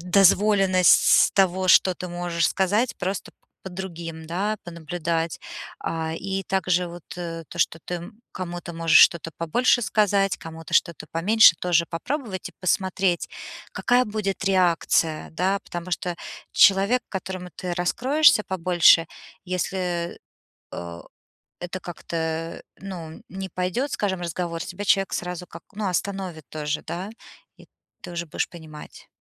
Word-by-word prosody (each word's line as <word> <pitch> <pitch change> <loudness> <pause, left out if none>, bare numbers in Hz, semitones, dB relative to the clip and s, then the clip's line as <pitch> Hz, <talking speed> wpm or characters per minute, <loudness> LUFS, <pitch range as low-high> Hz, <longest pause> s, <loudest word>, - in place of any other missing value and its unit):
дозволенность 195 0 +5
того, 190 -1 +2
что 185 0 +6
ты 180 - -7
можешь 175 -1 0
сказать, 205 +6 +1
просто 190 +1 -3
п - - -53 0.3
по 190 - -7
другим, 170 -3 -7
да, 200 +6 -1
понаблюдать. 165 -1 -3 0.4
А, 160 -1 -3
и 195 +2 -3
также 180 -2 +1
вот, 175 0 -10
э, 165 -2 -5
то, - - -10
что 165 - +1
ты 175 +2 -5 0.2
кому-то 175 -1 -6
можешь 165 -1 +4
что-то 165 -1 +5
побольше 240 +9 +2
сказать, 200 -3 +2
кому-то 165 0 -10
что-то 170 -3 +1
поменьше 195 +3 +6
тоже 175 -2 +2
попробовать 210 - -4
и - - -16
посмотреть, 185 -1 0 0.4
какая 250 0 +2
будет 210 -3 -3
реакция. 175 -4 +2
Да, 190 +4 +1
потому 175 +1 -6
что 175 0 -2 0.4
человек, 200 +6 +5
которому 185 -1 -5
ты 180 -2 -4
раскроешься 255 - +4
побольше, 175 -2 +4 0.4
если, 180 -1 -2 0.6
э 85 -1 -7 0.6
это 180 +1 -5
как-то 165 -1 -4 0.2
ну, 175 -5 -8
не 190 +1 -5
пойдет, 185 - -2
скажем, 190 -3 -1
разговор, 170 0 -3
тебя 205 - -6
человек 195 -1 +2
сразу 180 0 -4
как 165 - -11
ну, 210 -1 -3
остановит 185 -3 -3
тоже, 150 0 -3
да, 185 +4 -5 0.5
и - - -16 0.4
ты - - -8
уже 170 0 -4
будешь 155 - -2
понимать. 160 -3 -12
180 Hz, 135 wpm, -24 LUFS, 170-195 Hz, 0.6 s, что